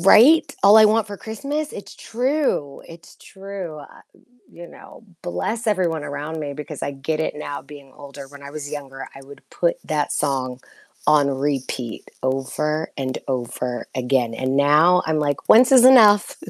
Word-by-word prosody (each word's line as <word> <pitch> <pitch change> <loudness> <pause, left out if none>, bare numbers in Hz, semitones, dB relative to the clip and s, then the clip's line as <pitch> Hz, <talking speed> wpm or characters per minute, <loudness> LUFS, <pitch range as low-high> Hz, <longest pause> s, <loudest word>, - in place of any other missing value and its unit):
Right, 240 - +7 0.2
all 205 +2 +7
I 215 - +7
want 220 0 +1
for 205 -1 -9
Christmas 285 +7 -5
it's 200 0 -10
true 250 - -2
it's 165 0 -14
true, 195 -4 -9
wel - - -9
I - - -18 0.5
you 175 - -12
know, - - -15 0.2
bless 220 +6 -4
everyone 175 -7 0
around 150 +3 -6
me, 145 -2 -5
because 150 +1 -8
I - - -2
get 140 +3 -4
it 160 - -2
now 145 -2 -6
being 140 -1 -14
older. 140 -1 -11
When 140 0 -14
I 140 - -9
was 145 -1 -8
younger, 135 -2 -8
I 135 - -12
would 140 +1 -14
put 170 -1 -1
that 150 -2 -2
song 130 -3 -2 0.5
on 150 -2 +4
repeat 135 -4 -4
over, 135 +4 -2
and 130 -1 -3
over 125 -1 -4
again, 125 -2 0
and 130 +2 -2
now 155 +6 +4
I'm 160 -1 0
like, 145 -2 -2
"Once 245 +4 +6
is 255 -2 +7
enough, 215 -6 +6
150 Hz, 170 wpm, -21 LUFS, 140-200 Hz, 0.5 s, Right